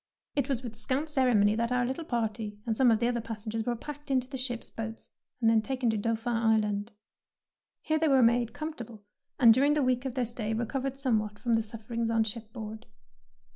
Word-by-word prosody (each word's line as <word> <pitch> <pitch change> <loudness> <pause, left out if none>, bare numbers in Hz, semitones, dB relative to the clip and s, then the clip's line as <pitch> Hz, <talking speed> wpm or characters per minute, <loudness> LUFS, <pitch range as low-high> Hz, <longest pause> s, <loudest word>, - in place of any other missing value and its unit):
'' - - -58
It 280 -1 0
was 260 -2 -1
with 230 -3 -6
scant 265 +8 -1
ceremony 245 -7 +4
that 230 +2 -1
our 250 -1 +2
little 265 +6 -3
party 220 -5 -2
and 225 -2 0
some 255 +1 +5
of 225 - +5
the 235 - +2
other 240 -1 0
pas 225 -1 -7
sengers 220 +1 -3
were 240 - +1
packed 295 +4 -9
into 255 -2 +1
the 265 - -7
ship's 250 -2 -3
boats 225 0 -6 0.3
and 225 -2 +4
taken 255 -1 0
to - - -1
Dauphin 230 +3 -1
Island. 220 -2 +1 0.9
Here 315 0 +1
they 320 - +2
were 270 -3 +5
made 235 0 +3
comfortable, 240 -9 -7 0.4
and 235 -4 +8
during 280 +5 +3
the 300 -2 +2
week 255 0 +1
of 260 -2 -3
their 250 -2 +1
stay 225 -2 -3
recov 250 +4 -2
ered 270 0 -5
somewhat 215 -6 0
from 235 +1 -1
the 225 - +3
sufferings 225 +1 -3
on 225 -1 +3
shipboard. 220 0 -7
235 Hz, 215 wpm, -29 LUFS, 220-260 Hz, 0.9 s, and